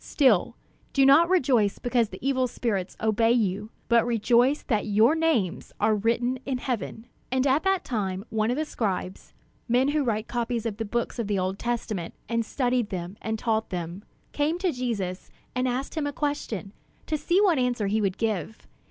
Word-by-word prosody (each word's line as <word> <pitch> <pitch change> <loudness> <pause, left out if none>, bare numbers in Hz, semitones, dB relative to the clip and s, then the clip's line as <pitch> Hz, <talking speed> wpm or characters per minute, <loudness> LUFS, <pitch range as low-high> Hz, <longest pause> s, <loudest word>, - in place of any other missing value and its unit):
Still, 255 - +3 0.4
do 270 -1 +4
not 305 +5 +6
rejoice 255 - +3
because 240 -3 +1
the - - -8
evil 260 -2 +2
spirits 205 -6 -3
obey 225 +1 +3
you; 210 -2 0 0.2
but 235 -1 +4
rejoice 240 +4 +2
that 215 -5 0
your 215 +7 +4
names 320 - 0
are 220 - +3
written 235 +4 +1
in 265 -2 -2
heaven." 240 -2 -4 0.3
And 260 +1 +1
at 280 +2 +3
that 385 -1 +2
time, 195 -4 -2
one 220 0 +1
of 250 - 0
the 310 - 0
scribes 190 -8 -4 0.3
men 250 +3 +3
who 295 0 +1
wrote 220 -3 -1
copies 235 -1 -2
of 215 -3 -3
the 225 - -3
books 235 +3 -2
of 230 - -1
the 205 -1 0
Old 185 +1 -1
Testament, 225 -7 -3
and 230 0 0
studied 245 -1 0
them, 180 0 -5
and 220 0 -2
taught 220 -1 0
them 175 +1 -5 0.3
came 300 +3 0
to 365 -1 0
Jesus 215 - -3 0.2
and 255 0 0
asked 255 +2 -2
him 310 -3 -1
a 285 - -3
question, 240 -9 -3 0.3
to 310 - -1
see 345 +5 +2
what 370 -8 +4
answer 245 -4 0
he 210 +2 +1
would 195 -2 0
give. 220 -2 -2
235 Hz, 185 wpm, -26 LUFS, 210-260 Hz, 0.4 s, not